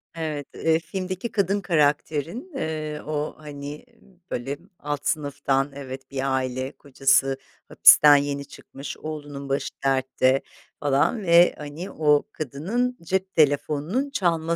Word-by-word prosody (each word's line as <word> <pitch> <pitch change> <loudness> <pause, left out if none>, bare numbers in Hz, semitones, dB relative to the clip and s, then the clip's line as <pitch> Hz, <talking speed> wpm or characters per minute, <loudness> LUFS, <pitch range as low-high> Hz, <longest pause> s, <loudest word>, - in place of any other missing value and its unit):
Evet, 155 -4 -4
eee, 160 0 +2
filmdeki 185 +5 -4
kadın 200 0 +1
karakterin, 155 - 0
eee, 155 - -3
o, 150 0 -2
hani, 145 -1 -8 0.5
böyle, 135 +4 -3 0.2
alt 145 -1 -4
sınıftan, 140 -2 0
evet, 135 -1 -8
bir 135 0 0
aile. 130 +1 -2
Kocası 135 -1 +2 0.3
hapisten 150 -1 +8
yeni 140 0 0
çıkmış, 140 0 -9
oğlunun 145 -3 -7
başı 135 - -1 0.2
dertte 130 0 +2 0.4
falan 145 - +2
ve 170 0 +6
hani 150 +5 -7
o 150 -2 +3
kadının 195 - -2
cep 190 +3 -2
telefonunun 150 - +1
çalma 170 - 0
150 Hz, 120 wpm, -24 LUFS, 140-165 Hz, 0.5 s, hapisten